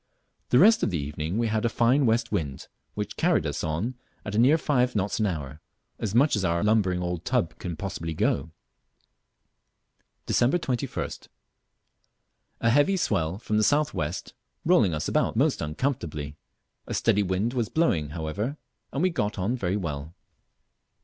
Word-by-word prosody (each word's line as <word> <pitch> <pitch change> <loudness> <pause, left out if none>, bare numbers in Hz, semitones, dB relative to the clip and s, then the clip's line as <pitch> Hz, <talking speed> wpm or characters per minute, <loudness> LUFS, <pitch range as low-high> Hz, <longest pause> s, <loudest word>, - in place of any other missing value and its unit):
The 125 - +4
rest 220 - +6
of - - +1
the 90 - -1
evening 75 +5 -3
we 120 - +1
had 110 -1 0
a 120 - +2
fine 125 +4 +3
west 115 +1 +1
wind, 70 -5 -3 0.3
which - - -4
carried - - +2
us - - -3
on 85 +11 -1 0.3
at 105 - -4
near 130 +8 +5
five 125 -6 +1
knots 100 +1 0
an 110 - +2
hour, 75 -4 -5 0.4
as 110 -2 -3
much 140 +3 +4
as 105 - -1
our 85 0 +1
lumbering 100 -4 +2
old 90 -1 -3
tub 85 -1 -1
can 85 -2 -4
possibly 80 -3 -4
go. 75 +1 0 1.8
Dec. 125 +8 +3
21st. 125 -6 -3 1.3
A 115 - +3
heavy 145 +9 +4
swell 90 - 0
from 110 -1 -1
the 110 - +3
south 150 +5 +2
west 80 +4 -4 0.3
rolling 115 - +4
us 75 - -3
about - - +1
most - - +2
uncomfortably. 75 - -3 0.5
A - - -3
steady 105 - +2
wind 100 +5 0
was 120 -5 -1
blowing 85 - +1
however, 85 - -3 0.3
and 140 - -1
we 185 - +3
got 105 -10 -2
on 100 +7 0
very 100 -5 -1
well. 80 -3 -5
105 Hz, 165 wpm, -26 LUFS, 80-120 Hz, 1.8 s, rest